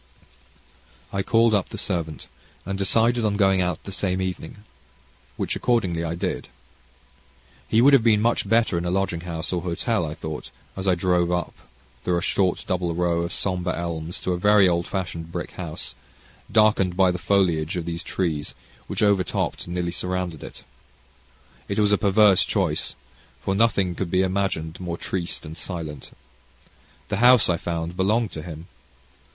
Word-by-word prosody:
I 100 Hz, -, 0 dB
called 115 Hz, +3 st, +3 dB
up 100 Hz, -3 st, +1 dB
the -, -, -7 dB
servant, 80 Hz, -7 st, -3 dB, 0.4 s
and 95 Hz, +2 st, -3 dB
decided 115 Hz, +5 st, +2 dB
on 105 Hz, -2 st, +1 dB
going 95 Hz, -2 st, +4 dB
out 90 Hz, -2 st, -2 dB
the 100 Hz, -, -7 dB
same 95 Hz, -1 st, -1 dB
evening, 95 Hz, +2 st, -5 dB, 0.7 s
which -, -, -1 dB
accordingly 95 Hz, -9 st, +1 dB
I 85 Hz, 0 st, -2 dB
did. 85 Hz, -, -3 dB, 1.2 s
He 115 Hz, +2 st, +3 dB
would 140 Hz, +2 st, +7 dB
have 135 Hz, -, +7 dB
been 110 Hz, -3 st, +4 dB
much 115 Hz, -2 st, +1 dB
better 115 Hz, -6 st, +3 dB
in 85 Hz, -, -4 dB
a -, -, 0 dB
lodging 90 Hz, -2 st, 0 dB
house, 85 Hz, 0 st, -4 dB
or 90 Hz, -, 0 dB
hotel, 90 Hz, +4 st, -1 dB
I 75 Hz, -1 st, -4 dB
thought, 80 Hz, -1 st, -6 dB, 0.3 s
as 95 Hz, 0 st, -4 dB
I 95 Hz, -, +4 dB
drove 90 Hz, -1 st, +1 dB
up 90 Hz, 0 st, -1 dB, 0.5 s
through 90 Hz, -1 st, +1 dB
a -, -, -1 dB
short 95 Hz, -3 st, +1 dB
double 90 Hz, -2 st, 0 dB
row 85 Hz, -1 st, +1 dB
of 85 Hz, +1 st, -3 dB
sombre 90 Hz, -1 st, -1 dB
elms 85 Hz, 0 st, -4 dB
to 90 Hz, -, -1 dB
a 90 Hz, -, -3 dB
very 105 Hz, 0 st, +5 dB
old 85 Hz, -1 st, +1 dB
fashioned 85 Hz, -3 st, -4 dB
brick 85 Hz, 0 st, -4 dB
house, 80 Hz, -7 st, -6 dB, 0.6 s
darkened 105 Hz, -5 st, +3 dB
by 95 Hz, -2 st, +5 dB
the 90 Hz, -, -4 dB
foliage 85 Hz, -4 st, +1 dB
of 85 Hz, -, -3 dB
these 85 Hz, 0 st, -4 dB
trees, 80 Hz, -5 st, -2 dB, 0.3 s
which -, -, -1 dB
overtopped, 100 Hz, -4 st, +1 dB
and 85 Hz, -, -5 dB
nearly 90 Hz, -1 st, -1 dB
surrounded 90 Hz, -3 st, -3 dB
it. -, -, -10 dB, 1.0 s
It 100 Hz, -, -3 dB
was 105 Hz, -1 st, +3 dB
a 105 Hz, -, +5 dB
perverse 100 Hz, -1 st, +5 dB
choice, -, -, -1 dB, 0.4 s
for 95 Hz, -, -1 dB
nothing 100 Hz, -4 st, +2 dB
could 90 Hz, 0 st, -3 dB
be 95 Hz, +2 st, +2 dB
imagined 95 Hz, -4 st, -1 dB
more 85 Hz, -2 st, -4 dB
triste 90 Hz, -2 st, -4 dB
and 80 Hz, +1 st, -8 dB
silent. 80 Hz, -6 st, -6 dB, 1.0 s
The 105 Hz, -, -1 dB
house, 125 Hz, 0 st, +6 dB
I 85 Hz, -, +2 dB
found, 85 Hz, 0 st, -3 dB
belonged 105 Hz, +4 st, +1 dB
to 80 Hz, -, -6 dB
him. 80 Hz, -1 st, -8 dB
90 Hz, 170 wpm, -24 LUFS, 85-100 Hz, 1.2 s, would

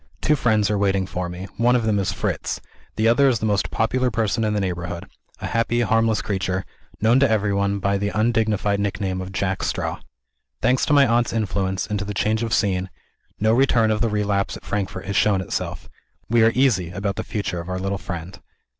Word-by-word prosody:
Two 150 Hz, -, +2 dB
friends 110 Hz, -6 st, +2 dB
are 105 Hz, -, 0 dB
waiting 95 Hz, -1 st, +1 dB
for 90 Hz, -1 st, -4 dB
me. 90 Hz, +2 st, -6 dB
One 120 Hz, +2 st, +3 dB
of 120 Hz, -, +1 dB
them 105 Hz, -2 st, +2 dB
is 95 Hz, -1 st, 0 dB
Fritz. -, -, -2 dB, 0.4 s
The 110 Hz, +1 st, +2 dB
other 135 Hz, +4 st, +5 dB
is 125 Hz, -3 st, +3 dB
the 110 Hz, -, -3 dB
most 105 Hz, -2 st, +1 dB
popular 125 Hz, +3 st, +1 dB
person 115 Hz, 0 st, 0 dB
in 105 Hz, -1 st, +1 dB
the -, -, +1 dB
neighborhood; 85 Hz, -2 st, -3 dB, 0.3 s
a -, -, -5 dB
happy, 115 Hz, +1 st, 0 dB
harmless 115 Hz, -1 st, +2 dB
creature, 95 Hz, -2 st, -2 dB, 0.4 s
known 115 Hz, +4 st, +4 dB
to 140 Hz, -, +4 dB
everyone 100 Hz, -2 st, +1 dB
by 100 Hz, 0 st, 0 dB
the 100 Hz, 0 st, -1 dB
undignified 105 Hz, -2 st, +1 dB
nickname 95 Hz, -2 st, -2 dB
of 95 Hz, 0 st, -6 dB
Jack 95 Hz, -1 st, -1 dB
Straw. -, -, -2 dB, 0.6 s
Thanks 125 Hz, +2 st, +2 dB
to -, -, +2 dB
my 140 Hz, -1 st, +6 dB
aunt's 120 Hz, -1 st, +1 dB
influence, 95 Hz, -3 st, -1 dB
and 105 Hz, -1 st, -2 dB
to 100 Hz, -, -3 dB
the 105 Hz, 0 st, -5 dB
change 110 Hz, +2 st, +1 dB
of 115 Hz, -1 st, -2 dB
scene, 95 Hz, -4 st, +1 dB, 0.5 s
no 110 Hz, +1 st, +3 dB
return 120 Hz, -3 st, +3 dB
of 105 Hz, -, -1 dB
the 115 Hz, -, +2 dB
relapse 100 Hz, -2 st, 0 dB
at -, -, -17 dB
Frankfort 95 Hz, -3 st, -3 dB
has 100 Hz, +2 st, -3 dB
shown 100 Hz, -1 st, +3 dB
itself. 95 Hz, -, -4 dB, 0.4 s
We 115 Hz, 0 st, +3 dB
are 115 Hz, -, +5 dB
easy 120 Hz, -10 st, +2 dB
about 100 Hz, +3 st, -3 dB
the -, -, -3 dB
future 100 Hz, -4 st, -3 dB
of 85 Hz, +2 st, -7 dB
our 90 Hz, -, -2 dB
little 95 Hz, +1 st, -2 dB
friend. 90 Hz, 0 st, -7 dB
105 Hz, 210 wpm, -22 LUFS, 95-115 Hz, 0.6 s, my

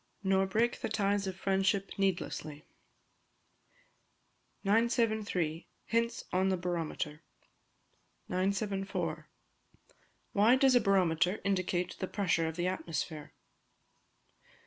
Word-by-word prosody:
[NOR 190 Hz, 0 st, +3 dB
BREAK 230 Hz, +5 st, +1 dB
THE -, -, -2 dB
TIES 200 Hz, -2 st, +1 dB
OF 190 Hz, -, -3 dB
FRIENDSHIP 195 Hz, +1 st, 0 dB
NEEDLESSLY.] 160 Hz, -5 st, -2 dB, 2.0 s
973. 215 Hz, -6 st, +1 dB, 0.2 s
Hints 230 Hz, +1 st, 0 dB
on 190 Hz, +1 st, +2 dB
the 190 Hz, -, +1 dB
Barometer. 165 Hz, -3 st, -3 dB, 1.1 s
974. 195 Hz, +1 st, -2 dB, 1.1 s
_Why 225 Hz, +6 st, +5 dB
does 270 Hz, -2 st, +5 dB
a 245 Hz, -, +5 dB
Barometer 185 Hz, -1 st, +2 dB
indicate 185 Hz, -2 st, -1 dB
the 185 Hz, -, -2 dB
Pressure 170 Hz, -5 st, +1 dB
of 160 Hz, -, -4 dB
the 175 Hz, +1 st, -1 dB
Atmosphere? 165 Hz, -4 st, -3 dB
190 Hz, 95 wpm, -32 LUFS, 175-205 Hz, 2.0 s, Why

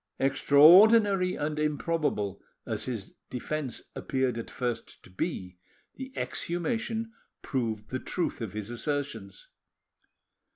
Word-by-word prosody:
Extraordinary 180 Hz, +8 st, +6 dB
and 150 Hz, +1 st, -2 dB
improbable 150 Hz, -, -1 dB, 0.2 s
as 110 Hz, -2 st, -3 dB
his 115 Hz, -6 st, -5 dB, 0.2 s
defence 135 Hz, +1 st, -4 dB
appeared 130 Hz, -3 st, -1 dB
at 115 Hz, -, -6 dB
first 120 Hz, -3 st, -4 dB
to -, -, -15 dB
be, 90 Hz, -, -4 dB, 0.3 s
the 265 Hz, 0 st, -8 dB
exhumation 225 Hz, +6 st, -2 dB, 0.3 s
proved 115 Hz, -6 st, -3 dB
the 130 Hz, -, -1 dB
truth 175 Hz, -4 st, -3 dB
of 110 Hz, -4 st, -4 dB
his 105 Hz, +1 st, -5 dB
assertions. 120 Hz, -7 st, -4 dB
140 Hz, 110 wpm, -29 LUFS, 115-170 Hz, 0.3 s, Extraordinary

